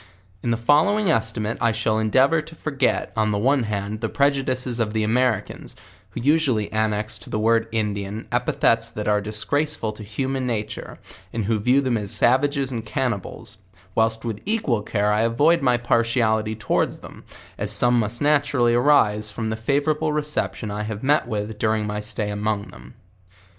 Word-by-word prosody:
In 120 - -2
the 115 - +1
following 165 - +3
estimate 115 -3 -1
T 115 -1 +2
shall 110 0 0
endeavor 130 +9 +3
to 160 +2 -12
forget, 140 -4 -1
on 110 -1 +1
the 105 - 0
one 135 +6 +2
hand, 105 +1 -3
the 115 - -1
prejudices 130 -3 0
of 110 -2 -1
the 110 -1 0
Americans, 115 -1 -1 0.3
who - - -7
usually 135 -7 +1
an 110 0 +2
nex 105 +1 -3
to - - -12
the - - -2
word 115 +1 +2
Indian, 105 -1 -3
epithets 115 -1 +2
that 105 -2 -5
are 105 -1 +2
disgraceful 110 +5 -1
to 105 0 -10
hu 110 +6 -3
man 135 -1 -2
nature, 110 -2 -4 0.3
and 115 -3 -3
who 110 +1 0
vijw 125 +6 +3
them 125 -3 +1
as 100 -2 -6
savages 135 +4 +2
and 115 -3 -4
cannibale, 115 -3 -3 0.5
whilst 115 +1 0
with 110 -3 -4
equal 185 - 0
care 105 0 0
I 105 - +2
avoid 145 +9 +3
my 125 -3 +3
partiality 115 -2 +1
towards 105 - -1
them, - - -12 0.4
as 105 0 -1
some 120 +3 +4
must 115 +4 -2
naturally 145 -5 +2
arise 115 -5 +3
from 110 0 -3
the - - -1
favourable 145 +7 0
reception 150 -7 -2
I 105 +1 -4
met 145 -1 +2
with 105 -1 -4
during 110 -1 0
rny 105 0 -3
etay 105 -1 -3
among 105 0 -2
them. - - -14
115 Hz, 175 wpm, -23 LUFS, 105-135 Hz, 0.5 s, some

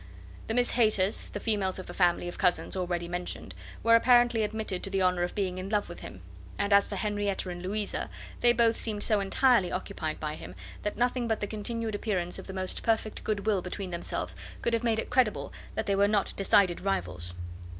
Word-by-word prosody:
The 225 - -1
Miss 245 0 +3
Hayters, 215 -4 +2
the - - -4
females 205 -4 0
of 185 - -6
the - - -8
family 175 -1 +2
of 175 - -7
cousins 180 -1 +1
already 175 -2 -2
mentioned, 175 +1 -5 0.3
were 230 - +5
apparently 240 -1 +5
admitted 215 -3 -2
to - - -2
the 195 -1 +1
honour 180 -1 +2
of 175 - -2
being 185 -3 -1
in 185 +1 -5
love 210 -1 +1
with 175 - -8
him; 90 - -9 0.4
and 200 0 +1
as 200 0 +6
for - - -5
Henrietta 205 -3 -1
and 175 0 -6
Louisa, 205 +3 -2 0.3
they 240 - +5
both 230 -1 +3
seemed 210 -2 -1
so 215 -2 +3
entirely 200 0 +3
occupied 160 -4 -3
by 150 -1 -3
him, 155 - -9 0.3
that 210 - -3
nothing 245 0 +1
but 220 -1 0
the - - -1
continued 220 +2 -3
appearance 190 -4 -1
of - - -9
the - - -5
most 185 -1 -3
perfect 220 -1 0
good 210 -2 -2
will 205 -4 +2
between 185 +1 -5
themselves 170 0 -3 0.3
could 235 - +1
have 230 0 +1
made 230 -2 +2
it - - -3
credible 250 -4 +1 0.2
that 220 - -1
they 200 - +1
were 200 +1 +4
not 205 -1 +2
decided 195 -2 +3
rivals. 90 - -2
200 Hz, 210 wpm, -29 LUFS, 185-220 Hz, 0.4 s, as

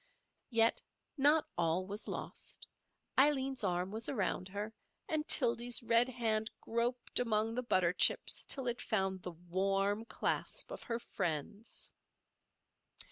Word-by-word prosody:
Yet 230 -2 +3 0.3
not 295 +2 +4
all 170 +2 +1
was 205 +3 -4
lost. - - -6 0.5
Aileen's 270 -3 +3
arm 180 0 0
was 220 +2 -1
around 190 -5 -1
her; 205 +3 -5 0.3
and 310 -1 -1
Tildy's 240 -2 +3
red 230 +2 +4
hand 225 -3 0
groped 240 +2 -1
among 225 -2 +1
the 250 - -1
butter 185 -7 +2
chips - - +3
till 270 -3 +1
it 240 -1 -1
found 190 -4 0
the 180 -1 -6
warm 195 +5 0
clasp - - -1
of - - -6
her 230 - -2
friend's. 195 - -4
225 Hz, 130 wpm, -35 LUFS, 190-245 Hz, 0.5 s, not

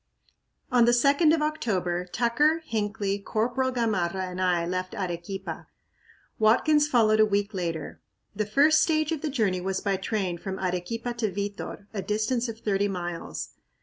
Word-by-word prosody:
On 245 -2 +5
the 240 - +4
2d 280 +6 +4
of 320 -1 +2
October, 185 - -1
Tucker, 290 - +1
Hinckley, 205 -3 -1
Corporal 240 +6 0
Gamarra 195 -7 0
and 185 +1 -4
I 175 -2 +2
left 185 +1 -3
Arequipa; 180 -1 -5 0.7
Watkins 295 +7 +4
followed 220 -6 +3
a 215 - +7
week 205 +1 0
later. 165 -5 -4 0.3
The 210 0 -1
first 295 +8 +5
stage 310 -1 +1
of 320 -3 -2
the 310 - -2
journey 210 -9 0
was 190 +1 -1
by 200 -2 0
train 190 -3 -2
from 190 +1 -5
Arequipa 190 +7 -3
to 220 -4 0
Vitor, 200 +1 -5
a 200 - -2
distance 220 +4 -1
of 225 - -6
thirty 200 -1 +1
miles. 175 -3 -5
210 Hz, 155 wpm, -27 LUFS, 185-245 Hz, 0.7 s, a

